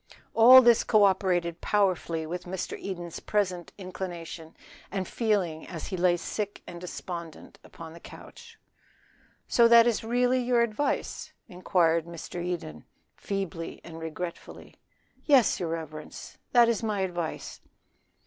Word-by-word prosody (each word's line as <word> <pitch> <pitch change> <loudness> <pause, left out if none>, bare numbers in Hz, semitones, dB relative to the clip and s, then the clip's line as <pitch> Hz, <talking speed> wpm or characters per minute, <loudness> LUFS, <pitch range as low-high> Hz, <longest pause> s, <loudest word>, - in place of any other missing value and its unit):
All 255 +3 +9
this 235 -1 +5
co 215 -2 +4
operated 180 -3 +1
powerfully 180 -5 0
with 175 +2 -5
Mr. 180 0 -4
Eden's 175 -3 -6
present 185 -4 -2
inclination 175 -4 -7 0.3
and 190 -2 -3
feeling 195 -9 -1
as 165 -3 -7
he 195 - -3
lay 175 -1 +2
sick 205 +3 -5
and 175 -1 -9
despondent 170 -2 -8
upon 165 -1 -11
the 170 - -12
couch. - - -13 0.9
"So 235 -1 +5
that 230 0 +7
is 235 -2 0
really 245 +2 +2
your 245 -1 +2
advice?" 235 +5 -2
inquired 170 -3 +1
Mr. 170 +1 -7
Eden, 165 - -5 0.3
feebly 190 -4 -5
and 165 -1 -10
regretfully. 165 +2 -7 0.5
"Yes, 270 -7 +4
your 170 - -2
reverence, 155 -2 -7
that 240 -1 +6
is 230 -2 0
my 210 -3 -1
advice." 175 -4 -4
180 Hz, 130 wpm, -27 LUFS, 170-215 Hz, 0.9 s, All